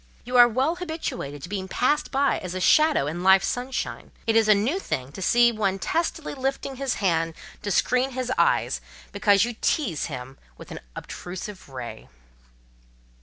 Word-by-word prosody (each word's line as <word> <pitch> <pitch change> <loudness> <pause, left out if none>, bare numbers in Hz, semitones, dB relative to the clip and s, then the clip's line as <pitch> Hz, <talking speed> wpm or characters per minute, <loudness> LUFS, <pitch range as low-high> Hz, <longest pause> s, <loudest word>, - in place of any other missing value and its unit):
You 250 +1 -4
are 245 -1 +9
well 265 +9 0
habituated 315 - -5
to - - -7
be 190 -2 -3
passed 295 +9 +1
by 275 0 +1
as 180 0 -6
a - - -2
shadow 305 - +4
in 160 +4 -4
Life's 190 +1 +5
sunshine: 250 +2 -3 0.2
it 225 - +1
is 225 -1 +4
a 215 - +7
new 245 - 0
thing 130 - -4
to 190 - -9
see 240 +5 +5
one 200 -4 0
testily 325 - -2
lifting 270 0 -3
his 270 -1 -1
hand 165 -4 0 0.3
to 205 - -4
screen 250 +6 +1
his 255 0 -3
eyes, - - +2 0.3
because 205 -1 +3
you 240 - -4
tease 220 - 0
him 130 +1 -8 0.2
with - - -12
an - - -6 0.2
obtrusive 185 0 -8
ray." 130 -3 -8
220 Hz, 170 wpm, -25 LUFS, 185-265 Hz, 0.3 s, are